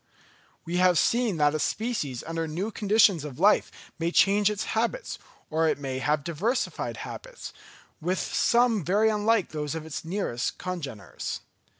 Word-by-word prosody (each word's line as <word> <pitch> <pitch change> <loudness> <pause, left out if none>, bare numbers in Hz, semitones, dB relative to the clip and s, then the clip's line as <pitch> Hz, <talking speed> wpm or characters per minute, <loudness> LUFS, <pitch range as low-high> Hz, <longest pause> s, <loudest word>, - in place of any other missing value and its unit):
We 175 +2 -2
have 180 -1 +4
seen 235 -3 +2
that 150 -1 +3
a 155 - -1
species 185 - -2
under 165 0 -3
new 180 +8 -3
conditions 205 -5 +3
of 145 -4 -7
life 200 +6 +4 0.3
may 165 0 +1
change 200 +3 +4
its 210 0 -2
habits, 235 - -2 0.3
or 160 +1 +2
it - - +1
may 135 -2 -4
have 150 +2 0
diversified 190 - -2
habits, - - -9 0.5
with 180 +4 0
some 235 -3 +2
very 205 +7 +3
unlike 215 -1 +2
those 150 0 -4
of 160 -1 -5
its 160 - -5
nearest 165 -9 -2
congeners. 140 - -5
180 Hz, 155 wpm, -27 LUFS, 155-215 Hz, 0.5 s, have